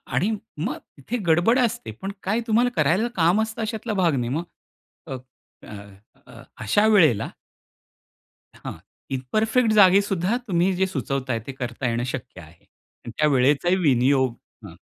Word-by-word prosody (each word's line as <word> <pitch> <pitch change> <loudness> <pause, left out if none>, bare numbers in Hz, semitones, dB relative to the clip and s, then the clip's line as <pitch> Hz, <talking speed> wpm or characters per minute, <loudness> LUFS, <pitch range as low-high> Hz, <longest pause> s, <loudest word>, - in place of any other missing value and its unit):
आणि 210 +5 +1 0.3
मग 230 - -3 0.2
इथे 145 - -4
गडबड 175 +11 +4
असते 235 - -1
पण 195 - -4
काय 210 +5 0
तुम्हाला 235 +3 +3
करायला 200 +8 +2
काम 175 +5 +3
असतं 220 0 -4
अशातला 220 0 -3
भाग 175 -7 +2
नाही 120 -2 -2
मग 165 +3 -2 0.7
अ, 130 - -3 0.5
अ, 100 0 -14 0.2
अशा 155 - +2
वेळेला 160 - +4 1.3
हां. - - -7 0.4
इ 135 - 0 0.2
परफेक्ट 220 +1 +2
जागी 200 -2 +6
सुद्धा 195 +3 -1
तुम्ही 180 0 +2
जे 190 +1 +1
सुचवताय, 135 -9 -3
ते - - -4
करता 125 -1 -4
येणं 115 +1 -1
शक्य 110 -7 -7
आहे 80 +1 -18 0.4
अन् 120 - -6
त्या 150 - +3
वेळेचा 140 +4 +2
विनियोग 130 -4 +2 0.3
हां. - - -11
170 Hz, 150 wpm, -23 LUFS, 130-215 Hz, 1.3 s, जागी